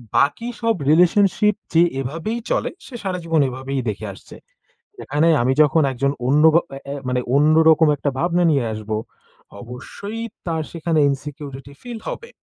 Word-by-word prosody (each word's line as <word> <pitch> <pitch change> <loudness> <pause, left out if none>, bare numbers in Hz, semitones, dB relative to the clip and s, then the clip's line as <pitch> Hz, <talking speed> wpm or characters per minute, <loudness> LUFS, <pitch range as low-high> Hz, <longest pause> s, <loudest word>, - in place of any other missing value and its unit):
বাকি 145 - +2
সব 230 -1 +2
রিলেশনশিপ 195 +5 +4 0.2
যে, 165 - +5 0.2
এভাবেই 165 - -3
চলে - - 0 0.2
সে 255 - -10
সারাজীবন 165 -5 0
এভাবেই 130 +1 -4
দেখে 105 +1 -5
আসছে। - - -14 0.7
এখানে 150 +4 +1
আমি 130 +2 +2
যখন 155 +2 +4
একজন 140 +2 0 0.2
অন্য 150 +3 +4 0.3
এ - - -9
এ - - -5
মানে 125 0 0
অন্যরকম 160 +2 +5
একটা 145 0 -2
ভাবনা 175 +3 +1
নিয়ে 135 -5 +1
আসব, 110 0 -8 0.7
অবশ্যই 200 - -8 0.2
তার 160 -2 -1
সেখানে 165 -1 -1
ইনসিকিউরিটি 140 -1 -6
ফিল 240 -2 -7
হবে। 465 - -7
155 Hz, 145 wpm, -21 LUFS, 135-175 Hz, 0.7 s, যে